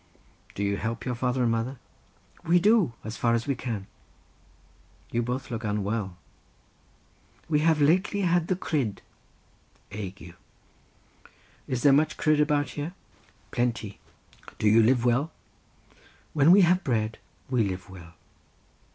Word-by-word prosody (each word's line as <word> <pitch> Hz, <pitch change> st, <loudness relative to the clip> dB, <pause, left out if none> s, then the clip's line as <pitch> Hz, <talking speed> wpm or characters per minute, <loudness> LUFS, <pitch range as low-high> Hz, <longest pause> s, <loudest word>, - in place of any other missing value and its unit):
"Do 100 Hz, -, -2 dB
you 100 Hz, 0 st, 0 dB
help 115 Hz, +3 st, -4 dB
your 125 Hz, -, -1 dB
father 125 Hz, +1 st, 0 dB
and 115 Hz, -, +2 dB
mother?" 115 Hz, +4 st, -2 dB, 0.7 s
"We 170 Hz, +2 st, +4 dB
do; 200 Hz, -, +3 dB
as 110 Hz, +1 st, -6 dB
far 115 Hz, -1 st, +2 dB
as 115 Hz, -, -2 dB
we 140 Hz, -, 0 dB
can." 115 Hz, -6 st, -5 dB, 1.3 s
"You 120 Hz, -, 0 dB
both 125 Hz, +2 st, -4 dB
look 115 Hz, 0 st, -4 dB
unwell." 105 Hz, -2 st, -2 dB, 1.3 s
"We 150 Hz, -2 st, +2 dB
have 160 Hz, 0 st, +3 dB
lately 180 Hz, +7 st, +2 dB
had 175 Hz, -2 st, +2 dB
the 185 Hz, -, +1 dB
cryd" 140 Hz, -, -2 dB, 0.9 s
(ague). 100 Hz, -4 st, -7 dB, 1.3 s
"Is 125 Hz, -2 st, -2 dB
there 140 Hz, -, +6 dB
much 155 Hz, +2 st, +2 dB
cryd 155 Hz, -1 st, +3 dB
about 150 Hz, -1 st, +1 dB
here?" 150 Hz, +5 st, -5 dB, 0.6 s
"Plenty." 120 Hz, -4 st, -2 dB, 0.6 s
"Do 110 Hz, -, +1 dB
you 110 Hz, +2 st, +6 dB
live 120 Hz, +2 st, +3 dB
well?" 130 Hz, +7 st, +1 dB, 1.0 s
"When 150 Hz, 0 st, +4 dB
we 195 Hz, +2 st, +8 dB
have 180 Hz, +1 st, +3 dB
bread 110 Hz, -5 st, -1 dB, 0.3 s
we 125 Hz, -3 st, +3 dB
live 95 Hz, -2 st, -4 dB
well." 85 Hz, -3 st, -13 dB
125 Hz, 135 wpm, -27 LUFS, 110-150 Hz, 1.3 s, we